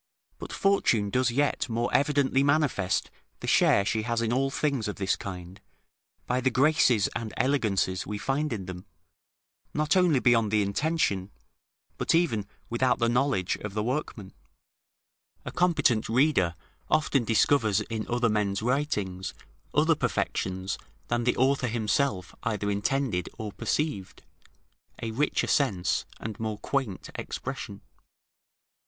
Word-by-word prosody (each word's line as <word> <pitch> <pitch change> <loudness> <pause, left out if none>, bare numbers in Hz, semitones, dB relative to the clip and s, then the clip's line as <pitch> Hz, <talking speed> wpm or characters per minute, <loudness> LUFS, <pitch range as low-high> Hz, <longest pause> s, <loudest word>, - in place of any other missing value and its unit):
But - - -7
Fortune 120 - +2
does 130 +1 +2
yet 140 +2 0
more 115 +1 -1
evidently 140 -2 +3
manifest 140 - +1 0.3
the - - -7
share 100 - +4
she 110 0 0
has 115 +1 -1
in 115 0 0
all 135 +2 +1
things 135 -5 -1
of 105 - -3
this 95 -1 0
kind, 90 0 -8 0.6
by 125 +1 0
the 130 - +3
graces 130 -5 +3
and 115 -2 -5
elegances 105 -9 +1
we 105 +1 -3
find 135 +8 -1
in 100 -5 -4
them, 90 +1 -8 0.9
not 150 +2 +2
only 175 -7 +4
beyond 115 -3 +3
the 105 0 +2
intention, 100 - 0 0.7
but - - +2
even 115 - +1 0.2
without 125 +2 +1
the 115 -1 +1
knowledge 120 -7 +1
of 105 -1 -7
the 105 - 0
workman: 120 -6 -3 1.1
a - - -4
competent 150 -12 +2
reader 115 - +2 0.3
often 150 -4 +2
discovers 110 -1 +3
in 110 -1 -4
other 120 0 +2
men's 105 -2 0
writings 105 -8 -1 0.4
other - - +4
perfections 95 +1 -2 0.3
than 120 0 0
the 125 - +1
author 135 0 +2
himself 110 -3 0
either 105 -2 -1
intended 100 -2 -1
or 110 -2 -5
perceived, 105 -6 -3 0.8
a 115 - -2
richer 145 +7 0
sense 100 -11 +1
and 110 -2 -6
more 110 -2 -3
quaint 125 -6 -3
expression. - - -6
115 Hz, 135 wpm, -27 LUFS, 100-135 Hz, 1.1 s, share